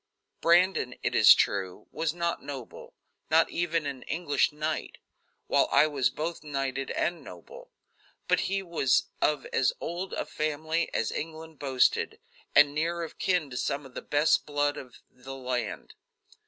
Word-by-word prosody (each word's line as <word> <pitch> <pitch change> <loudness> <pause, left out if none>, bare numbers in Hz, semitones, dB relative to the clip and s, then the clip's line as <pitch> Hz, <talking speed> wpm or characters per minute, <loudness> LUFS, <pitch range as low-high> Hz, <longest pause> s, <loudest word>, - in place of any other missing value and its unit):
Brandon, 170 -7 +3
it - - 0
is - - +8
true, 95 -2 -1
was 165 - -1
not 170 0 -2
noble; 135 -4 -9 0.3
not 160 +1 +4
even 170 -2 -1
an 140 -3 -4
English 160 -5 +1
knight, 155 +1 -3 0.5
while - - +2
I - - +6
was 140 -5 +1
both 160 +6 -4
knighted 135 -2 -3
and 170 +1 -1
noble; - - -12 0.6
but - - +3
he 195 0 -1
was 160 -8 +1
of 150 -3 +1
as 130 - +2
old 175 +3 -4
a - - -2
family 155 +2 -2
as - - -1
England 160 -1 -6
boasted, 130 -3 +1 0.4
and 145 -1 +7
near 170 +3 -1
of 165 - -9
kin 180 -7 0
to 125 - -5
some 140 +2 -2
of 135 - -13
the - - -6
best 145 +2 +2
blood 145 0 0
of 130 -4 -10
the 130 +2 -10
land. 125 -4 -4
150 Hz, 155 wpm, -28 LUFS, 135-165 Hz, 0.6 s, is